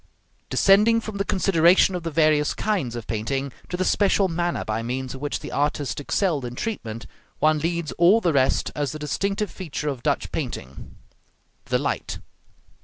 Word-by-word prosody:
Descending 210 +4 +5
from 215 -2 -6
the 200 - 0
consideration 185 -2 +4
of 180 - -3
the 165 - -3
various 155 -1 +2
kinds 180 - -1
of 120 -2 -6
painting, 135 +5 -2 0.2
to 180 - -3
the 185 - 0
special 200 0 +3
manner 175 0 -2
by 110 +1 -2
means 125 +2 -4
of 135 - -9
which 145 0 -3
the - - -7
artist 145 -1 -1
excelled 150 0 0
in 120 0 -5
treatment, 115 - -4 0.3
one 155 0 +3
leads 170 0 -2
all 180 +6 +6
the 175 -7 +1
rest 135 -1 +2
as 145 -3 -2
the - - -5
distinctive 195 +7 -2
feature 150 -5 -4
of 135 -4 -4
Dutch - - -1
painting 65 +3 -6 0.7
the - - +1
light. - - -3
155 Hz, 175 wpm, -24 LUFS, 135-190 Hz, 0.7 s, all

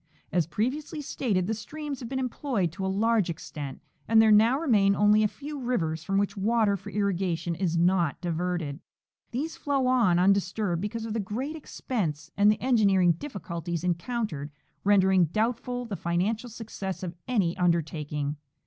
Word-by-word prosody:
As 175 -4 +1
previously 275 - -2
stated, 225 -10 -1
the 220 - -1
streams 280 +5 -6
have 235 - -7
been 265 - -2
employed 250 - -1
to 180 +4 -6
a - - 0
large 210 0 +2
extent 145 -4 -6 0.2
and 225 0 +5
there 220 -1 +6
now 225 +5 +6
remain 205 -10 +3
only 210 +1 +5
a 215 - +4
few 290 +6 -7
rivers 165 - -1
from 195 +3 0
which 200 +1 0
water 215 0 +2
for 200 +1 -8
irrigation 185 -4 -1
is 170 -1 -1
not 175 -2 +2
diverted.f 170 -3 -2 0.5
These 290 +7 -3
flow 275 -2 0
on 240 -9 +4
undisturbed 195 -1 +2
because 220 +2 -3
of 225 - -4
the 225 - -1
great 245 +10 -3
expense, 165 - -4
and 205 +1 +5
the 210 - -1
engineering 200 -8 +4
difliculties 170 - -5
encountered 175 - -2 0.3
rendering 190 -2 +5
doubtful 240 - -1
the 215 -4 -4
financial 195 +8 -1
success 205 -4 -6
of 175 -2 -4
any 200 -9 +1
undertaking. 155 -4 -1
200 Hz, 160 wpm, -27 LUFS, 175-230 Hz, 0.5 s, there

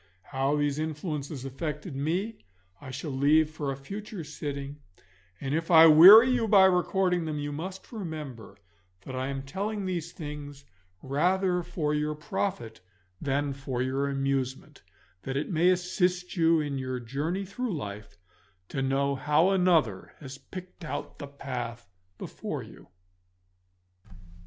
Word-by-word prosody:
How 135 +2 -1
these 145 0 0
influences 150 -3 -4
affected 150 +3 -5
me 175 +11 -2 0.4
I 135 - -9
shall 135 +4 -5
leave 150 +4 +3
for 150 -3 -3
a 135 - -5
future 200 +6 -7
sitting, 140 -1 -6 0.6
and 135 0 -3
if 165 +1 -1
I 165 -2 +9
weary 190 +11 +10
you 240 -3 +1
by 195 -2 +7
recording 180 -1 +2
them, 155 -1 -3
you 145 0 -3
must 185 +6 -7
remember 155 - -7 0.4
that 130 +7 -8
I 130 +1 -2
am 135 -1 -4
telling 200 +8 -3
these 170 -3 -3
things 145 -3 -8 0.4
rather 180 +6 +1
for 165 -3 -2
your 150 0 -1
profit 120 - -4 0.4
than 140 0 0
for 135 -2 -3
your 135 +2 -1
amusement; 135 -1 -2 0.4
that 130 +5 -3
it 150 - -3
may 170 +2 +4
assist 180 0 0
you 165 -2 +4
in 145 -3 -2
your 130 -1 -3
journey 150 - -3
through 210 -1 -3
life 105 -6 -8 0.5
to 135 - -3
know 135 +1 +1
how 150 +6 +2
another 170 - +2
has 135 -2 -9
picked 180 +6 -10
out 160 - -6
the 145 - -6
path 125 -4 -6 0.3
before - - -5
you. - - -14
150 Hz, 140 wpm, -28 LUFS, 135-180 Hz, 0.6 s, weary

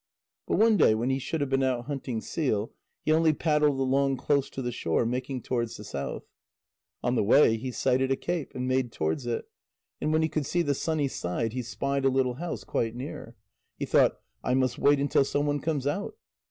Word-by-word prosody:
But - - +1
one 220 -1 +5
day 110 - +5
when 120 +4 0
he 135 - 0
should 155 +4 -3
have 140 -1 -1
been 135 0 +2
out 125 -2 0
hunting 135 -5 -3
seal, 115 -9 -1 0.3
he - - +2
only 160 0 +4
paddled 150 -2 +2
along 135 +1 +2
close 140 +1 +1
to 135 - -5
the 120 - -2
shore, 85 0 0
making 125 +1 -3
towards 120 -2 -2
the 105 - -9
south. 70 -8 -5 0.8
On 120 - +1
the 125 - +2
way 115 +2 +5
he 130 +4 -4
sighted 130 +2 +1
a - - +4
cape, 170 0 -3
and 125 0 -2
made 130 -2 +1
towards 80 - -2
it; 120 - -2 0.5
and 155 - 0
when 155 0 +3
he - - +3
could 155 -2 -2
see 175 -1 +1
the 145 - +1
sunny 155 0 0
side, 115 -1 -2
he 130 - -2
spied 140 +3 -2
a 135 - +5
little 130 -1 +1
house, 175 -2 -4
quite 115 0 -1
near. 120 -2 -7 0.4
He - - -2
thought: - - +3 0.2
"I 125 - +1
must 130 -2 +1
wait 145 0 +4
until 140 0 +3
some 145 +1 0
one 145 0 0
comes 145 -2 -2
out." 200 - -2
135 Hz, 215 wpm, -28 LUFS, 120-145 Hz, 0.8 s, one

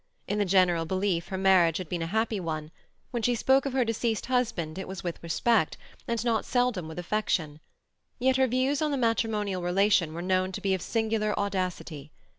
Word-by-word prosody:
In 205 +1 -1
the 205 - +2
general 180 -3 +3
belief 185 -2 0
her 190 - -4
marriage 185 -4 +4
had 185 - -5
been 175 +1 -3
a 165 - -2
happy 220 +2 0
one; 155 -3 -4 0.4
when 240 - -2
she 245 +2 +2
spoke 265 +4 +3
of 270 - -4
her 260 -2 +2
deceased 230 0 -1
husband 225 -10 -1
it 190 - -6
was 190 -1 -7
with 175 -2 -4
respect, 170 +2 +1 0.3
and 235 0 -1
not 230 -2 +1
seldom 245 -9 0
with 160 - -9
affection. 175 -5 -1 0.6
Yet 260 +1 +2
her 265 0 +4
views 260 +4 +1
on 305 - +1
the 285 - -1
matrimonial 220 -5 0
relation 180 -2 +2
were 170 - -4
known 185 0 +1
to - - -4
be 195 -1 +1
of 190 - -1
singular 220 +1 -1
audacity. 180 -7 -3
195 Hz, 200 wpm, -28 LUFS, 175-230 Hz, 0.6 s, marriage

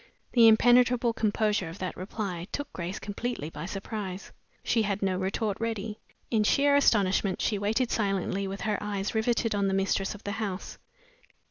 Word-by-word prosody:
The 235 -2 +7
impenetrable 245 +1 +5
composure 210 -4 0
of 165 - -9
that 185 -2 -4
reply 185 -2 -5
took 285 -1 -5
Grace 180 +2 -4
completely 205 -6 -4
by 150 +2 -6
surprise. 195 -1 -5 0.3
She 230 - +2
had 200 -1 -1
no 190 -1 +1
retort 195 +2 -2
ready. 220 -2 -3 0.3
In 220 -3 +3
sheer 280 +6 +4
astonishment 200 -7 +3
she 210 -3 0
waited 220 +5 0
silently 195 -2 0
with 195 +1 -5
her 210 -2 -1
eyes 205 -1 -3
riveted 225 0 +1
on 200 -1 +1
the 190 - +1
mistress 195 +1 0
of 205 - -13
the 205 - -3
house. 195 -3 -4
205 Hz, 165 wpm, -28 LUFS, 195-225 Hz, 0.3 s, The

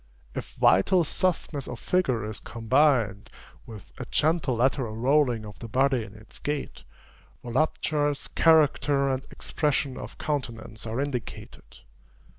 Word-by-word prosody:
If - - -6
vital 175 - +4
softness 160 -4 -1
of - - -6
figure 130 - 0
is 110 -1 -6
combined, 115 -3 +1 0.4
with 110 -4 -11
a 125 - -4
gentle 155 -4 +1
lateral 125 -2 0
rolling 125 -3 +2
of 105 -2 -11
the 115 - -7
body 130 +1 +2
in 105 0 -12
its 110 +1 -10
gait, 145 -1 -4 0.6
voluptuous 145 +3 0
character 145 -3 +3
and 130 0 -3
expression 145 -3 -1
of - - -9
countenance 115 -7 -4
are 115 +3 -3
indicated. 135 -5 -6
130 Hz, 125 wpm, -26 LUFS, 115-145 Hz, 0.6 s, vital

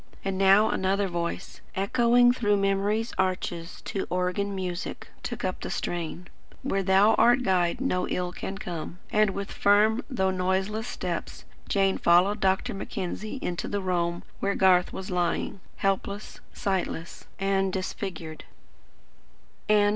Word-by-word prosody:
And 195 -1 -1
now 195 +3 +5
another 195 +1 +1
voice, 170 -1 -4
echoing 240 +5 +4
through 205 -5 +2
memory's 200 +3 0
arches 180 -2 -2
to 195 - -3
organ 185 +3 -1
music, 180 -2 -4
took - - -4
up - - -2
the - - -4
strain: 175 0 -4 0.4
"Where 195 - 0
Thou 195 +3 +5
art 240 +3 +5
Guide, 180 -5 +2
no 180 -9 0
ill 180 -1 -2
can 195 +2 -5
come." 175 -3 -6
And 215 -2 +4
with 200 0 -4
firm 215 +4 +3
though 190 -8 +1
noiseless 190 +4 -1
step, - - -3 0.4
Jane 195 -1 +2
followed 180 +5 +4
Dr. 190 -1 +1
Mackenzie 195 +4 -4
into 175 -1 -2
the 205 - -1
roam 175 -2 -1 0.2
where 200 0 0
Garth 185 -1 +4
was 190 0 -6
lying, 175 +2 -1 0.2
helpless, 200 +1 -2
sightless, 190 -5 -3
and 195 0 +1
disfigured. 185 -4 -5
195 Hz, 130 wpm, -27 LUFS, 180-205 Hz, 0.4 s, now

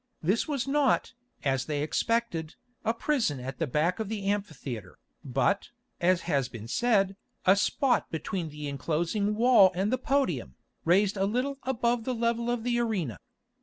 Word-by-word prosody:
This 195 +8 +1
was 275 -4 -2
not, 280 -1 +2 0.3
as 135 -2 +1
they 145 -2 -1
expected, 170 -2 -1 0.3
a 225 - +2
prison 230 - 0
at 130 +1 -6
the 165 - 0
back 155 - +1
of 220 -2 -3
the 210 -3 -4
amphitheatre, 145 - -3 0.3
but, 135 +9 0 0.3
as 175 0 +3
has 140 -6 0
been 115 -2 -8
said, 195 - +2 0.3
a 190 - +7
spot 255 +5 +1
between 165 +1 -3
the 150 0 -6
enclosing 170 +9 -1
wall 225 -5 +6
and 195 +6 0
the 255 - +1
podium, 180 - 0 0.3
raised 195 +4 +3
a 195 - +2
little 255 +6 -1
above 240 -2 0
the 255 +1 -2
level 235 0 0
of 240 -2 -1
the 240 0 +1
arena. 195 - -1
195 Hz, 165 wpm, -28 LUFS, 155-235 Hz, 0.3 s, a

